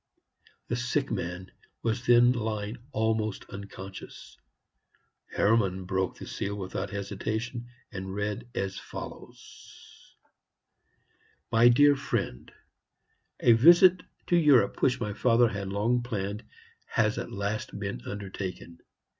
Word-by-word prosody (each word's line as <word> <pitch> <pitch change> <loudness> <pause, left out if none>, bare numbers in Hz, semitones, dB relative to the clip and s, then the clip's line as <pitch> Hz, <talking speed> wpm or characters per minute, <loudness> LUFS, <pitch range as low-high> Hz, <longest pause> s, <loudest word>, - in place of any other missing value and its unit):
The 120 - -1
sick 125 +3 -1
man 90 +2 -4 0.3
was 115 +2 -1
then 120 0 +6
lying 110 -2 -3
almost 110 -2 -1
unconscious. 100 -1 -9 0.9
Hermann 100 -4 +1
broke 95 0 -1
the - - -8
seal 100 +1 -4
without 95 0 -4
hesitation, 110 +4 -4 0.2
and 95 -1 -6
read 105 +3 -3
as 95 -1 -2
follows: - - -11 1.4
"MY 115 +1 +6
DEAR 145 +4 +6
FRIEND, 100 - -3 0.9
A 120 - +6
visit 175 +9 +7 0.2
to 175 - +2
Europe 145 -11 +4
which 130 -1 +2
my 105 -4 -3
father 120 +2 +3
had 100 -1 -4
long 110 +5 +1
planned 105 -3 -4 0.4
has - - +1
at - - -6
last 100 +2 -3
been - - -4
undertaken. 95 -4 -6
110 Hz, 115 wpm, -28 LUFS, 100-120 Hz, 1.4 s, visit